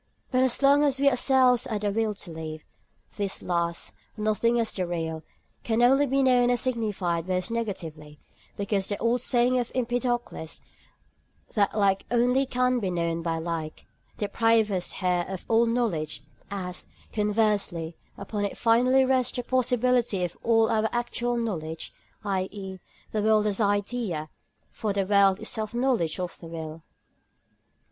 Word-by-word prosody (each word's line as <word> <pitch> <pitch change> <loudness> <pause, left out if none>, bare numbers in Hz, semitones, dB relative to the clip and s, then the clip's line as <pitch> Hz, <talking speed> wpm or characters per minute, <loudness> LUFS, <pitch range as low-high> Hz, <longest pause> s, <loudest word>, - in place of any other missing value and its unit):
But 255 -1 +3
as 260 +1 0
long 280 +1 +6
as 275 -2 +1
we 280 - +3
ourselves 255 -1 +3
are 220 -4 -1
the 205 0 -1
will 220 0 0
to 195 -3 -6
live, 155 -1 -7 0.5
this 200 -2 -3
last—nothing 210 +6 -1
as 225 -1 0
the 185 -2 -2
real—can 170 +7 -3
only 270 +4 +5
be 270 +1 +2
known 250 -2 +4
and 245 -1 +2
signified 205 -9 -1
by 185 - 0
us 185 +4 -3
negatively, 165 -10 -5 0.4
because 200 -1 -1
the 205 - -2
old 235 +1 +1
saying 250 0 +3
of 245 - -3
Empedocles, 240 -8 -2 0.9
that 205 0 +1
like 195 -2 +2
can 240 - +2
only 250 +3 +3 0.3
be 195 -5 -1
known 170 -1 -1
by 165 -1 -1
like, 160 -1 -4 0.3
deprives 220 +1 +2
us 185 -2 -1
here 180 -1 0
of 190 -2 -6
all 230 +1 +4
knowledge, 220 -11 -1 0.3
as, 185 -2 -5 0.3
conversely, 205 -6 0 0.2
upon 205 +1 -4
it 200 - -3
finally 250 +3 +4
rests 255 -1 +1
the 245 - -2
possibility 250 -5 +1
of 175 -1 -3
all 225 -1 +4
our 220 0 +2
actual 240 0 -1
knowledge, 165 -9 -4 0.3
i.e., 190 -1 -3 0.3
the 215 - 0
world 215 0 +3
as 210 +1 0
idea; 205 -5 -1 0.4
for 210 -2 -2
the 195 -1 0
world 200 -1 +5
is - - -16
the - - -6
self 220 +1 -3
knowledge 240 -11 +1
of 180 -1 -4
the 165 - -10
will. 160 -1 -7
210 Hz, 155 wpm, -26 LUFS, 180-240 Hz, 0.9 s, long